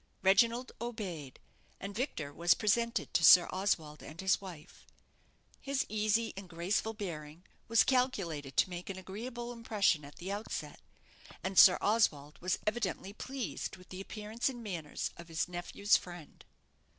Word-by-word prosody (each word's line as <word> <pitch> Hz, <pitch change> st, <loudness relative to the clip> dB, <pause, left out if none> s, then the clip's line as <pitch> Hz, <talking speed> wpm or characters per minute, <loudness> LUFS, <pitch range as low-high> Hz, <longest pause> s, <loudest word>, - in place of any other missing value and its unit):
Reginald 230 Hz, +6 st, +4 dB
obeyed, 190 Hz, -, -5 dB, 0.4 s
and 200 Hz, +1 st, -6 dB
Victor 180 Hz, -, -3 dB
was 170 Hz, +3 st, +4 dB
presented 230 Hz, +2 st, 0 dB
to 170 Hz, -, +2 dB
Sir 175 Hz, +2 st, +9 dB
Oswald 165 Hz, -6 st, -1 dB
and 155 Hz, +2 st, -11 dB
his 190 Hz, +1 st, +2 dB
wife. 175 Hz, -6 st, -11 dB, 0.7 s
His 275 Hz, -1 st, -1 dB
easy 215 Hz, +1 st, +1 dB
and 195 Hz, -1 st, -8 dB
graceful 190 Hz, +6 st, -1 dB
bearing 165 Hz, -5 st, -6 dB, 0.2 s
was 230 Hz, 0 st, +5 dB
calculated 175 Hz, -, 0 dB
to -, -, +4 dB
make 175 Hz, +1 st, -6 dB
an 195 Hz, -, -4 dB
agreeable 235 Hz, +6 st, -6 dB
impression 210 Hz, -9 st, +1 dB
at 145 Hz, +1 st, -12 dB
the 185 Hz, +3 st, -6 dB
outset, 205 Hz, +2 st, -5 dB, 0.6 s
and 190 Hz, +1 st, -3 dB
Sir 185 Hz, 0 st, +9 dB
Oswald 155 Hz, -9 st, +1 dB
was 185 Hz, +1 st, 0 dB
evidently 215 Hz, -3 st, -2 dB
pleased 255 Hz, -4 st, -5 dB
with 185 Hz, -, -17 dB
the 185 Hz, +1 st, -6 dB
appearance 215 Hz, +5 st, -3 dB
and 240 Hz, -3 st, -7 dB
manners 170 Hz, -8 st, -4 dB
of 170 Hz, -, -10 dB
his 165 Hz, +1 st, -1 dB
nephew's 180 Hz, +3 st, +2 dB
friend. 175 Hz, -4 st, -11 dB
195 Hz, 150 wpm, -33 LUFS, 170-225 Hz, 0.7 s, Sir